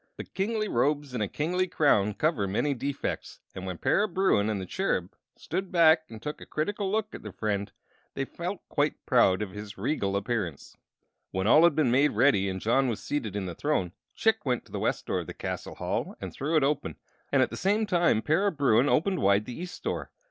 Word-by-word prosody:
But - - -9
kingly 215 +2 -1
robes 145 -1 0
and 120 - -2
a 105 - +1
kingly 180 - -1
crown 105 - +2
cover 150 -11 +1
many 140 +9 0
defects, 140 +2 -4
and 95 0 -6
when 90 -2 -4
Para 205 - +2
Bruin 185 - +2
and 105 -2 -1
the 95 - -5
Cherub 95 - -1 0.2
stood 190 0 -4
back 160 -2 +5
and 110 - -9
took 150 +7 -6
a - - -9
critical 195 +5 -2
look 215 0 -1
at - - -7
their 105 - -8
friend 100 0 -2 0.4
they 135 - -1
felt 175 +7 -6
quite 145 0 -1
proud 105 -6 +4
of 100 - -6
his 105 0 -8
regal 100 -3 -1
appearance. 100 - -3 0.5
When 95 +1 -2
all 150 +9 +6
had 170 -4 +4
been 150 -6 +2
made 140 +4 +3
ready 100 -8 +3
and 95 0 -3
John 130 +6 +2
was 115 -4 -2
seated 120 -9 -3
in 100 -2 -2
the 90 - -4
throne, 120 - -1 0.2
Chick 225 -1 +2
went 125 -3 -1
to - - -20
the - - -3
west - - -1
door - - -1
of - - -6
the - - -7
castle - - -5
hall - - -3
and - - -6
threw 150 +4 -2
it 155 - +4
open, 145 +1 0 0.4
and 135 -2 +4
at - - -2
the - - -5
same 210 +3 +1
time 175 - +2
Para 190 +7 +2
Bruin 140 - +3
opened 185 +5 +2
wide 100 +2 +3
the 125 - -6
east 175 +6 -8
door. - - -3
140 Hz, 220 wpm, -28 LUFS, 105-170 Hz, 0.5 s, all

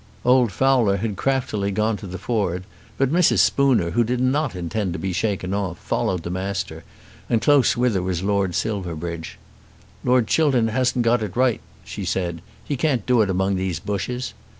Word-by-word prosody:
Old 125 -3 +4
Fowler 125 -5 +3
had 105 +1 -3
craftily 110 -4 -1
gone 105 +2 0
to 100 - -9
the 95 +1 -6
ford; 95 -4 -1 0.3
but 135 0 +1
Mrs. 175 +1 +4
Spooner, 130 -12 +3
who 120 +7 +2
did 120 +2 -1
not 130 0 +1
intend 90 +2 -2
to - - -4
be 95 -1 -3
shaken 95 -1 -1
off, 95 -3 -2
followed 95 -7 -2
the 85 - -4
Master, 95 -4 -4 0.5
and 115 - +3
close 140 -2 +4
with 125 -1 +2
her 95 - 0
was 90 -1 -2
Lord 100 -3 0
Silverbridge. 85 -5 -4 0.7
"Lord 125 -2 +3
Chiltern 130 -4 +2
hasn't 125 0 +1
got 120 0 +3
it 105 -4 -4
right," 125 -6 +2 0.2
she 100 +5 -6
said. 90 -2 -2 0.2
"He 145 - -2
can't 130 -5 0
do 125 -3 +3
it 105 - +1
among 95 +1 +1
these 90 -3 -2
bushes." 105 +7 -3
105 Hz, 180 wpm, -22 LUFS, 95-125 Hz, 0.7 s, Old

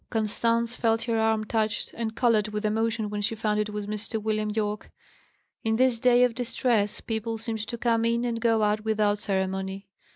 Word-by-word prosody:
Constance 230 +1 0
felt 225 -1 +1
her 230 -1 0
arm 220 -1 +2
touched, 215 -1 -1
and 225 -1 -4
coloured 230 -4 +3
with 210 0 -3
emotion 220 0 0
when 205 0 -2
she 225 +2 -1
found 210 -1 0
it 210 0 0
was 210 -1 -4
Mr. 215 +2 -4
William 215 0 -1
Yorke. 210 -1 -2 0.7
In 220 0 +1
this 250 -1 +3
day 245 0 +5
of 250 -2 +3
distress, 235 -3 0
people 225 0 -3
seemed 225 0 -4
to 235 - -4
come 230 -1 +1
in 235 +1 +1
and 230 -1 -2
go 225 -2 +3
out 210 0 +1
without 210 -2 +1
ceremony. 190 -1 -2
220 Hz, 190 wpm, -27 LUFS, 210-230 Hz, 0.7 s, day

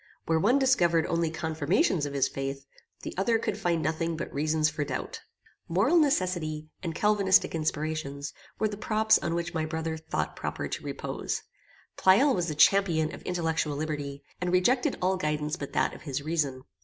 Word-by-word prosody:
Where 160 -1 +2
one 235 +10 +4
discovered 175 - +3
only 170 -1 0
confirmations 160 0 0
of 140 - -7
his 135 -1 +2
faith, 135 0 -5 0.4
the - - -5
other 225 +4 +3
could 215 -2 -2
find 175 -6 0
nothing 160 +2 -1
but - - -5
reasons 155 +2 +1
for 155 -1 -2
doubt. - - -5 0.5
Moral 195 - +2
necessity, 175 - 0
and 165 -3 -4
calvinistic 200 -2 +3
inspiration, 155 -2 -2 0.3
were 215 - +1
the 205 -1 -6
props 220 0 +3
on 170 0 -2
which 170 0 -3
my 160 -2 -1
brother 160 0 -3
thought 160 - -3
proper - - -4
to - - -5
repose. - - -4 0.5
Pleyel 240 +10 +5
was 175 -2 0
the 155 - -3
champion 160 -1 +4
of - - -9
intellectual 165 -4 -1
liberty, 145 -2 -4 0.2
and 180 -1 0
rejected 240 +8 +2
all 190 +1 +2
guidance 150 -2 -1
but 140 -5 -7
that - - +1
of - - -11
his 140 -2 -4
reason. 145 -5 -1
160 Hz, 175 wpm, -28 LUFS, 155-185 Hz, 0.5 s, Pleyel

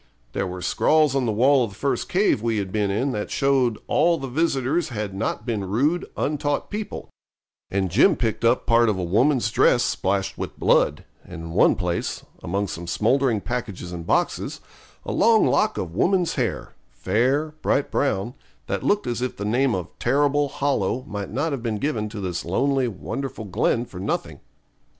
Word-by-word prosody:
There 95 - -1
were 90 0 -6
scrawls 155 -3 +3
on 130 -3 +1
the - - +1
wall 130 +5 +4
of 115 - -2
the 95 - -14
first 135 0 -1
cave 190 - +2
we 115 -1 0
had 100 -2 -3
been 105 -1 0
in 120 +8 0
that 105 -3 -3
showed 135 -5 +2
all 170 0 +3
the 135 - -5
visitors 145 +2 0
had 105 -5 -4
not 100 +4 -3
been 110 -5 -2
rude, 145 - +1
untaught 145 -1 -1
people; 210 0 -5 0.6
and 95 -2 -1
Jim 150 - +5
picked 115 -3 -2
up 115 +2 +3
part 115 -1 +4
of 105 - 0
a 90 - -2
woman's 115 - +2
dress 120 0 +4
splashed 95 0 -1
with - - -6
blood, - - +2 0.2
and 80 - -9
in 80 - -7
one 85 - +4
place, 90 -3 -3 0.2
among 100 +4 -2
some 85 -1 -6
smouldering 115 +4 +1
packages 105 -7 -4
and 85 -2 -7
boxes, - - 0 0.5
a - - -3
long 225 0 +4
lock 215 - +2
of 85 -3 -4
woman's 180 - +2
hair, - - -2 0.2
fair, 130 +10 0
bright 140 - +1
brown, 120 -4 0 0.3
that - - -2
looked 205 0 +1
as 120 0 -2
if 125 - -3
the 100 - -4
name 120 +3 +2
of 90 -2 -4
Terrible 145 +1 +2
Hollow 130 -4 -1
might 105 -6 -5
not 145 +8 -1
have 135 -4 -3
been 115 -2 -2
given 110 -4 -2
to 105 0 -7
this 90 -3 -3
lonely, 135 +8 +1
wonderful 120 +2 -5
glen 115 +5 0
for 90 - -10
nothing. 95 - -3
120 Hz, 185 wpm, -23 LUFS, 100-140 Hz, 0.6 s, Jim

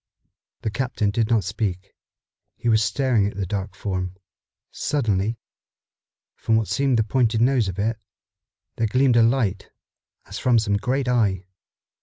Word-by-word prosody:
The 110 - -1
captain 115 -4 -1
did 110 +1 0
not 115 -4 +3
speak. 95 0 -3 0.6
He 120 - -2
was 110 -1 +4
staring 110 0 +1
at 100 - -6
the 100 - -1
dark 95 0 -4
form. 95 -2 -3 0.6
Suddenly, 115 -5 -1 1.0
from 110 - 0
what 110 -2 +1
seemed 130 +5 +1
the 110 - +3
pointed 115 0 +1
nose 120 -2 +3
of 95 -1 -5
it, 110 +2 -1 0.8
there 115 - +1
gleamed 125 +2 +3
a 120 - +6
light, 115 -5 +1 0.6
as - - -7
from 125 -2 +3
some 105 -2 +1
great 130 +4 -1
eye. 100 -7 +1
110 Hz, 150 wpm, -23 LUFS, 100-120 Hz, 1.0 s, a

